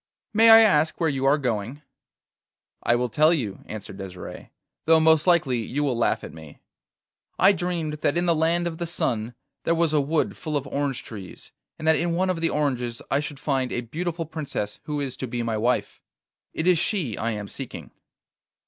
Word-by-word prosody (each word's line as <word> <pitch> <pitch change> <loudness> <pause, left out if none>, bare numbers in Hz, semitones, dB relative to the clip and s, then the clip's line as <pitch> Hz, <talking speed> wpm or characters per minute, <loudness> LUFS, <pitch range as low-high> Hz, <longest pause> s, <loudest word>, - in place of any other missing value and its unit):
May 225 +1 +6
I 225 0 +10
ask 155 -8 +3
where 165 -3 +2
you 135 -1 -2
are 140 +2 +5
going?' 125 +1 -3 1.0
'I 120 - +2
will 125 +1 0
tell 155 +8 +4
you,' 120 - -1
answered 105 -2 -8
Desire, 90 -2 -8 0.4
'though 160 0 +6
most 160 +1 +4
likely 150 -9 +3
you 135 +6 -2
will 135 -4 0
laugh 115 - +1
at - - -8
me. 80 -2 -12 0.8
I 190 - +6
dreamed 175 -5 -2
that 150 0 0
in 175 - +1
the 170 - +3
land 165 +2 +1
of 165 -2 -4
the 170 - -2
sun 120 -8 -1 0.3
there 165 - +2
was 165 -2 +1
a 150 - +4
wood 150 +3 0
full 155 -3 -3
of 140 - -4
orange 140 -1 -2
trees, 100 -6 -10 0.3
and 155 - -5
that 160 - +5
in 170 0 0
one 185 +2 +1
of 165 -3 -4
the 165 - +2
oranges 125 -5 -2
I 135 - +3
should 145 -1 -6
find 135 -4 -1
a 120 - -1
beautiful 165 +7 -4
princess 145 -10 -4
who 150 -1 -3
is 135 -3 -3
to 130 - -4
be 120 0 -3
my 115 -1 -1
wife. 120 +4 -1 0.5
It 160 - -3
is 180 -2 +4
she 165 - 0
I 115 +1 -2
am 105 -1 -5
seeking. 135 +4 -8
145 Hz, 200 wpm, -25 LUFS, 120-165 Hz, 1.0 s, I